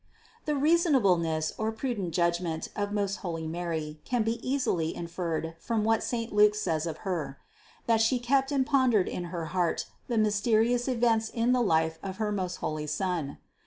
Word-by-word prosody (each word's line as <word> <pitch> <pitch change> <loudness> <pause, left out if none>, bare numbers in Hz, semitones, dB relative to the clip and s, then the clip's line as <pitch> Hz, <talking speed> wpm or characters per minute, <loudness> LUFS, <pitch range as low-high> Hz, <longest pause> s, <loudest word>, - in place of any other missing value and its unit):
The 300 - 0
reasonableness 215 - +2
or 220 0 0
prudent 225 -6 -3
judgment 170 -1 0
of 205 0 -2
most 200 -1 -1
holy 165 -4 -4
Mary 160 -2 -4
can 245 -3 0
be 225 +2 -1
easily 245 - 0
inferred 165 -1 -3
from 225 +3 -1
what 225 0 +2
saint 230 -2 -3
Luke 210 0 +5
says 165 -6 -1
of 165 - -6
Her: 155 -8 -2 0.5
that 225 -1 +3
She 225 +3 +3
kept 265 +3 +1
and 270 -2 +2
pondered 255 -9 +3
in 175 - -4
her 170 -1 -4
heart 180 -2 0 0.2
the 235 - -1
mysterious 220 +3 +2
events 230 -3 +2
in 235 +1 +1
the 250 -1 +3
life 160 -6 +1
of 190 -1 -6
her 215 -1 -1
most 185 -3 -2
holy 155 -3 -3
Son. 160 -2 -2
205 Hz, 170 wpm, -28 LUFS, 170-235 Hz, 0.5 s, Luke